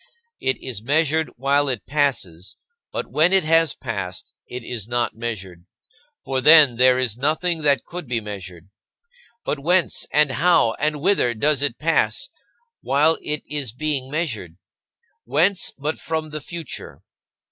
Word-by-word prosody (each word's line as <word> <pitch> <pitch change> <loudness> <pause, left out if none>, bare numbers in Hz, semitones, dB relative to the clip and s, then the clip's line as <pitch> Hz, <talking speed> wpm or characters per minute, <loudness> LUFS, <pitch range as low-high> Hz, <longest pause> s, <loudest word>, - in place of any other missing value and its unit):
It 130 - 0
is 120 -6 -4
measured 155 +5 +1
while 140 +2 +2
it 125 -5 -3
passes, 125 - -2 0.3
but - - -5
when 160 +4 +3
it 190 -1 +4
has 165 -1 +3
passed 100 -7 -6
it 125 -1 -7
is 115 -3 -5
not 120 0 -1
measured; 95 -6 -6 0.6
for 135 -1 -1
then 150 -4 +7
there 125 0 +5
is 125 -3 -1
nothing 160 +4 0
that 145 -2 +2
could 175 -4 -7
be 120 -1 -1
measured. 95 -4 -9 0.7
But 150 - -2
whence, 175 +4 +1
and 150 -2 +3
how, 170 -7 +3
and 150 0 -1
whither 165 -10 +2
does 145 +4 +1
it 140 -4 0
pass 165 +1 0 0.5
while 150 +4 +2
it 150 0 -3
is 140 -7 -3
being 135 -1 -2
measured? 120 - -4 0.7
Whence, 180 +5 +1
but 150 +3 -3
from 160 -1 -3
the 155 0 -5
future? 165 -2 -7
140 Hz, 145 wpm, -22 LUFS, 120-155 Hz, 0.7 s, then